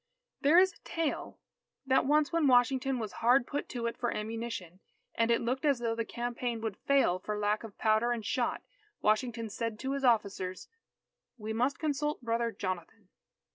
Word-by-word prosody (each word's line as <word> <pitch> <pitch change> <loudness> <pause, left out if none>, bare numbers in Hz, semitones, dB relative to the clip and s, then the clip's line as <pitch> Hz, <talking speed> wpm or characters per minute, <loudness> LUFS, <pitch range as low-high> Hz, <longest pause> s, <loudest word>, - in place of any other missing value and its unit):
There 300 +4 +5
is 375 +1 +6
a - - -22
tale, 330 -3 -3 0.5
that 265 -1 +3
once 300 +2 +3
when 330 -3 +3
Washington 260 +1 +3
was 220 -3 -4
hard 245 +2 +5
put 285 - -4
to 240 -2 -4
it 235 - -1
for 240 - -1
ammunition, 220 -5 -5 0.3
and 230 0 +1
it 235 - +3
looked 250 +3 -1
as 285 -3 +3
though 235 -1 -1
the 230 0 -1
campaign 240 0 -3
would 220 -3 -3
fail 270 -10 +2
for 210 +3 -4
lack 210 +1 0
of 220 -3 -10
powder 220 +2 +2
and 230 -3 -2
shot, 245 +1 -1 0.4
Washington 225 +1 +1
said 225 +1 -4
to 265 +4 -3
his 275 0 -2
officers, 200 -6 0 0.7
"We 220 -1 -4
must 250 +5 +1
consult 295 -2 -1
Brother 230 0 0
Jonathan." 185 +1 -5
235 Hz, 175 wpm, -31 LUFS, 215-265 Hz, 0.7 s, is